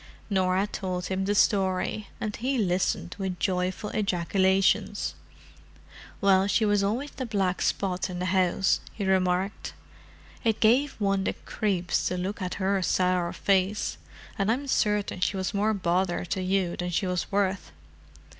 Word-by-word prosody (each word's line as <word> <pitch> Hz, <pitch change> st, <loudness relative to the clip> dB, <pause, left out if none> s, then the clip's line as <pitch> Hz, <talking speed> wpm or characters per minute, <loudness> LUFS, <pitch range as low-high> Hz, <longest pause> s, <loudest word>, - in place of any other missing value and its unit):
Norah 190 Hz, 0 st, +2 dB
told 185 Hz, -3 st, -4 dB
him 190 Hz, +1 st, -1 dB
the 205 Hz, +1 st, +1 dB
story, 195 Hz, +1 st, +1 dB
and 215 Hz, -1 st, -3 dB
he 260 Hz, +3 st, -1 dB
listened 180 Hz, -3 st, 0 dB
with 190 Hz, -2 st, -3 dB
joyful 185 Hz, +2 st, -1 dB
ejaculations. 190 Hz, 0 st, +1 dB, 1.1 s
"Well, 195 Hz, -1 st, +4 dB
she 215 Hz, +2 st, +2 dB
was 205 Hz, -1 st, +3 dB
always 235 Hz, +9 st, -1 dB
the 260 Hz, -, -5 dB
black 195 Hz, -4 st, 0 dB
spot 190 Hz, -1 st, 0 dB
in 180 Hz, -, -5 dB
the 180 Hz, -, -2 dB
house," 185 Hz, 0 st, +2 dB
he 205 Hz, -, -4 dB
remarked. 190 Hz, +1 st, 0 dB, 0.7 s
"It 225 Hz, -3 st, +1 dB
gave 255 Hz, +6 st, +4 dB
one 195 Hz, -2 st, 0 dB
the -, -, 0 dB
creeps 190 Hz, -5 st, 0 dB
to 180 Hz, -, -2 dB
look 190 Hz, +3 st, -3 dB
at 180 Hz, -1 st, -3 dB
her 195 Hz, 0 st, 0 dB
sour 180 Hz, -1 st, +1 dB
face, 195 Hz, +1 st, 0 dB, 0.4 s
and 200 Hz, +2 st, +2 dB
I'm 265 Hz, +5 st, -1 dB
certain 210 Hz, -7 st, 0 dB
she 190 Hz, +2 st, 0 dB
was 190 Hz, +2 st, -2 dB
more 205 Hz, +2 st, +2 dB
bother 180 Hz, -1 st, 0 dB
to 185 Hz, +2 st, -2 dB
you 185 Hz, -1 st, 0 dB
than 180 Hz, 0 st, -3 dB
she 175 Hz, +3 st, 0 dB
was 180 Hz, -1 st, -2 dB
worth." 195 Hz, -1 st, 0 dB
190 Hz, 155 wpm, -27 LUFS, 185-205 Hz, 1.1 s, Well